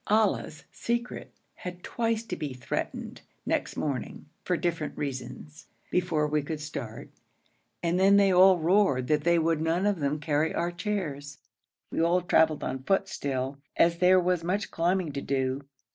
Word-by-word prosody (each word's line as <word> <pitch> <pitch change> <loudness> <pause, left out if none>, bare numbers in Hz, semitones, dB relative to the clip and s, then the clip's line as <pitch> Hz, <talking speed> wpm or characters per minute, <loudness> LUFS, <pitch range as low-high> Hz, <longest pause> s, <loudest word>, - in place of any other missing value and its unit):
Ali's 210 -7 +1
secret 235 +1 -3 0.3
had 180 0 -8
twice 230 -1 -1
to 230 - -5
be 145 -4 -4
threatened, 125 -2 -4 0.2
next - - -1
morning, 135 -6 -3 0.2
for 180 - 0
different 165 -4 -2
reasons 135 +2 -6 0.2
before 175 -4 +1
we 150 0 +1
could 150 +2 -5
start, 150 0 -7 0.7
and 170 +1 +1
then 195 +1 +6
they 200 -2 +5
all 185 +1 +7
roared 170 -6 +3
that 150 -1 +2
they 170 +1 +4
would 165 -1 +1
none 165 +4 +1
of 205 -4 +1
them 145 +1 -1
carry 150 +1 0
our 170 +1 0
chairs. 165 -7 -4 0.5
We - - 0
all 170 +2 +3
travelled 160 -3 +3
on 130 0 -3
foot 195 +7 +1
still, 135 0 -3 0.2
as 170 0 +3
there 185 +1 +6
was 180 -1 +1
much 195 +4 -1
climbing 175 -1 0
to 140 0 -4
do. 135 0 -1
165 Hz, 160 wpm, -28 LUFS, 145-185 Hz, 0.7 s, all